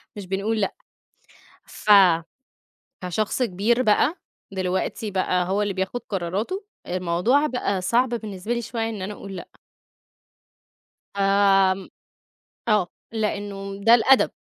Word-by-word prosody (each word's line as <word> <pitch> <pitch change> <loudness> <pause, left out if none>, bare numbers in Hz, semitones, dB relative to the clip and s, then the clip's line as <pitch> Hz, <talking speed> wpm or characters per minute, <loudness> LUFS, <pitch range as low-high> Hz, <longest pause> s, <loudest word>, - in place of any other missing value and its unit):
مش 205 -2 -7
بنقول 205 +4 -1
لأ. 195 - -1 0.9
ف - - -13 1.2
كشخص 210 +7 -1
كبير 230 +3 +1
بقى 255 - +2 0.3
دلوقتي 190 +4 -2
بقى 185 -2 0
هو 200 +2 +1
اللي 205 -1 -1
بياخد 190 +6 -2
قراراته، 200 - -3 0.2
الموضوع 185 - +1
بقى 225 -8 -1
صعب 235 +8 +2
بالنسبة 220 -2 -4
لي 235 - -2
شوية 225 0 -3
إن 210 -4 -6
أنا 195 +3 -4
أقول 195 -1 -9
لأ. 180 - -8 1.7
فآمم، 195 -1 +3 0.8
آه، 210 -5 +3 0.3
لإنه 200 -2 -3
ده 230 +2 +8
الأدب، 265 +3 +4
200 Hz, 115 wpm, -23 LUFS, 190-225 Hz, 1.7 s, ده